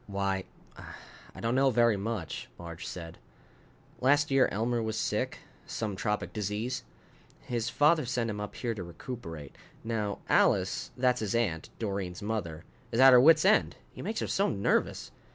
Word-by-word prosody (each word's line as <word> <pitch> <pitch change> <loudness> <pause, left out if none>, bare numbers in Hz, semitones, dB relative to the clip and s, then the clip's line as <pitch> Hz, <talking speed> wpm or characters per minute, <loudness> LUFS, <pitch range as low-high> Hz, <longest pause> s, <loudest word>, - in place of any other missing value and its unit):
"Why, 100 -1 -1 0.9
I - - -9
don't 115 +1 0
know 135 +1 +4
very 120 -2 +4
much," 100 -4 -4
Marge 85 -1 -8
said. 85 -2 -8 0.8
"Last 145 +2 +3
year 135 -1 +4
Elmer 115 +3 0
was 110 -1 -2
sick, - - -1 0.3
some 105 -3 -3
tropic 105 +3 -2
disease. 105 +5 -3 0.6
His 120 -1 -2
father 155 +4 +4
sent 120 -1 -1
him 105 0 -5
up 105 - -6
here 120 -2 -2
to 105 - -6
recuperate. 85 - -8 0.3
Now 110 -3 -2
Alice - - +2
that's 125 -1 +2
his 110 0 -2
aunt, 95 -9 -1
Doreen's 100 -3 -4
mother 90 -7 -3 0.3
is 115 - -1
at 135 0 +9
her 125 - +8
wits' 160 +4 +6
end, 215 +3 +4 0.2
he - - -9
makes 215 +4 -3
her - - -1
so 200 +1 +1
nervous." 100 - 0
110 Hz, 160 wpm, -30 LUFS, 100-125 Hz, 0.9 s, at